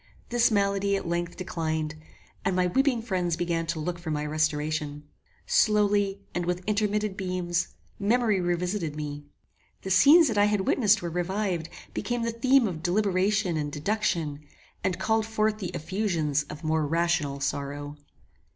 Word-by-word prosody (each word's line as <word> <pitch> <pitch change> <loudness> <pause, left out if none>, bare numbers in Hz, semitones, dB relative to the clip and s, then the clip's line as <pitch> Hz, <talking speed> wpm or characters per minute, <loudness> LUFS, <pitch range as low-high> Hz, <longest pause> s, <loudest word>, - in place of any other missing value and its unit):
This 240 -1 +3
malady, 200 -1 +1
at 195 - -3
length, 170 0 -2
declined, 160 -4 -2 0.5
and 190 - 0
my 180 0 +3
weeping 245 +5 +1
friends 180 -6 -1
began 170 -1 -1
to 165 -1 -2
look 175 +3 -3
for 170 -2 -6
my 150 -1 -1
restoration. 150 -1 -1 0.4
Slowly, 205 -2 +2
and 175 - -1
with 180 +1 -2
intermitted 210 -1 0
beams, 180 -3 -1 0.3
memory 215 -1 +2
revisited 175 -2 -1
me. 145 -1 -5 0.6
The 190 - -4
scenes 295 - +7
that 220 -4 0
I 205 - +6
had 210 -1 +1
witnessed 210 -1 +3
were 170 - -3
revived, 180 -1 -2 0.2
became 240 -1 -2
the 230 - 0
theme 255 +1 +3
of 165 -5 -5
deliberation 190 0 +1
and 145 -1 -2
deduction, 160 -3 -1 0.4
and 180 -2 0
called 220 +3 +1
forth 215 -1 0
the 185 -4 -3
effusions 160 -5 -1
of 155 +2 -8
more 155 -1 +1
rational 165 -3 0
sorrow. 145 +1 -3
180 Hz, 150 wpm, -27 LUFS, 160-210 Hz, 0.6 s, scenes